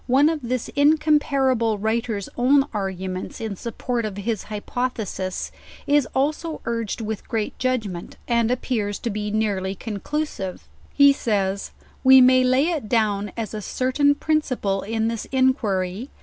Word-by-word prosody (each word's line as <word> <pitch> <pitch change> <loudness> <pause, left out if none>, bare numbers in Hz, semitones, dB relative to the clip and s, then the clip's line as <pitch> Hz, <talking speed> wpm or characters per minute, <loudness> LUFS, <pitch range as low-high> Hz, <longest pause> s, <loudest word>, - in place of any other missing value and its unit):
One 270 +4 +5
of 320 -1 -1
this 250 -1 -2
incomparable 280 -6 +2
writer's 220 -1 -1
own 270 +3 +4
argu 190 -2 -3
ments 185 +5 -5
in 220 -3 -4
support 235 +3 -3
of 210 -2 -4
his 215 0 -2
hypothesis, 210 -3 -3 0.3
is 290 -2 +3
also 305 +4 -1
urged 230 -1 -2
with 220 -1 -5
great 220 -2 -2
judgment, 220 -9 -2
and 235 -1 +2
appears 225 -5 -1
to 235 - -3
be 210 0 -3
nearly 200 -3 -1
conclusive. 210 -1 -4 0.3
He 280 -1 +6
says, 200 -6 -1 0.3
"We 265 0 +9
may 255 0 +6
lay 260 +5 +3
it 290 -11 -3
down 210 -3 +1
as 225 -1 -4
a 215 - -4
certain 260 +6 +1
principle 255 -11 0
in 225 +1 -1
this 230 -1 -3
inquiry 235 -5 0
230 Hz, 145 wpm, -23 LUFS, 205-260 Hz, 0.3 s, We